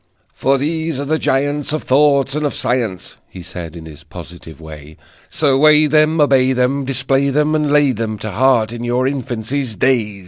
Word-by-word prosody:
"For 135 +1 +1
these 160 +1 -3
are 140 - -3
the 155 +2 -1
giants 145 +2 -1
Of 155 - -3
thought 140 0 +2
and 150 +1 -2
of 145 - -2
science," 115 -7 -3
He 90 - -11
said 90 -2 -8
in 80 -1 -10
his 75 -1 -12
positive 80 -1 -12
way: 75 -1 -12 0.3
"So 140 -3 +1
weigh 155 +1 +5
them, 155 +2 +2
obey 130 -3 +3
them, 130 +2 0
Display 135 +1 0
them, 150 +2 +1
and 150 -2 0
lay 145 -2 +3
them 110 -2 -4
To 110 +1 -6
heart 120 0 +1
in 120 0 -7
your 120 +2 0
infancy's 130 -2 -3
day!" 105 -3 0
130 Hz, 185 wpm, -17 LUFS, 110-145 Hz, 0.3 s, weigh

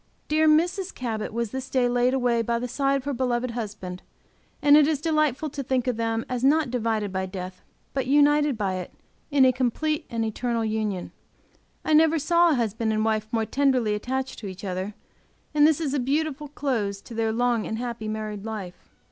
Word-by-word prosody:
Dear 310 +1 +3
Mrs. 350 +5 +2
Cabot 225 -4 -3
was 230 -1 -2
this 265 0 -5
day 255 -2 +2
laid 245 +1 +2
away 245 -3 +2
by 235 +1 0
the 245 +1 -3
side 275 +3 +1
of 275 - -2
her 285 +1 -2
beloved 250 -1 -1
husband, 210 -6 -6 0.6
and 290 0 +6
it 300 -1 +6
is 310 -3 +1
delightful 305 -2 0
to 280 - -4
think 255 -2 0
of 250 -2 0
them 225 0 -1
as 250 -1 -3
not 290 -1 +3
divided 220 -5 -1
by 190 0 -1
death, 185 -1 -7 0.3
but 270 -2 -1
united 290 -1 +4
by 195 -3 -1
it 180 - -6 0.4
in 280 -3 +5
a 255 - +6
complete 295 +5 -1
and 230 -1 -1
eternal 230 +1 -1
union. 215 -4 -2 0.7
I 315 - +2
never 320 +1 +5
saw 340 +3 +4
a 310 - +3
husband 225 -2 -1
and 215 0 +1
wife 215 -1 0
more 225 -1 +1
tenderly 255 -5 +2
attached 260 +5 -3
to 210 - -6
each 190 0 -8
other, 190 +2 -4 0.6
and 300 0 +6
this 315 -1 +2
is 295 -4 -2
a 285 - +1
beautiful 295 +3 -1
close 235 -9 -2
to 235 - -11
their 225 -1 0
long 235 -1 +1
and 220 - -3
happy 235 -2 -4
married 215 -2 -4
life. 210 -5 -7
245 Hz, 200 wpm, -25 LUFS, 220-285 Hz, 0.7 s, and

